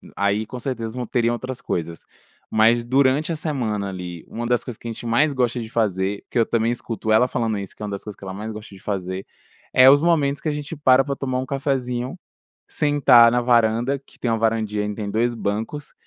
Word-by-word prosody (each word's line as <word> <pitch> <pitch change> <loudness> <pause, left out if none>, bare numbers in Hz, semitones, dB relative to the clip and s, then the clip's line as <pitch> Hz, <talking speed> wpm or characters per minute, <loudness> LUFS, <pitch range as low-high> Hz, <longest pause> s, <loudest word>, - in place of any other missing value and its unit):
aí 100 +2 +1
com 125 - -8
certeza 115 -3 -4
vão 125 -1 -3
teria 120 0 +1
outras 130 +1 -5
coisas, 85 -1 -4 0.4
mas 115 +2 +4
durante 135 +5 +2
a - - -1
semana 120 -10 -2
ali, 90 -3 -7
uma 120 +1 -5
das 120 0 +1
coisas 120 -4 -7
que - - -9
a - - -3
gente 115 - -9
mais 140 +6 +3
gosta 125 -2 0
de 110 - -7
fazer, 100 -3 -1
que - - +1
eu 115 - +4
também 115 +1 +1
escuto 115 -2 -3
ela 110 +3 +5
falando 115 -5 -1
isso 100 -2 -8
que - - -9
é - - -2
uma 105 - -5
das 100 - -5
coisas 105 -2 -8
que - - -15
ela 95 -1 -6
mais 105 +3 -5
gosta 105 -1 -10
de 95 - -13
fazer, 95 -2 -4 0.5
é 130 - +7
os 145 +1 +6
momentos 150 -4 +2
que 155 - -1
a - - 0
gente 150 +2 -5
para 135 -2 +5
pra 140 0 -3
tomar 130 -2 -2
um 130 - -3
cafezinho, 130 0 -2 0.5
sentar 140 -6 +5
na 120 +1 +2
varanda 120 +2 +2
que 135 - -22
tem 120 - -1
uma 115 - +1
varandinha 110 -2 0
e 105 0 -4
tem 105 -1 -4
2 120 +3 +1
bancos, 110 +7 -4
115 Hz, 230 wpm, -22 LUFS, 105-130 Hz, 0.5 s, é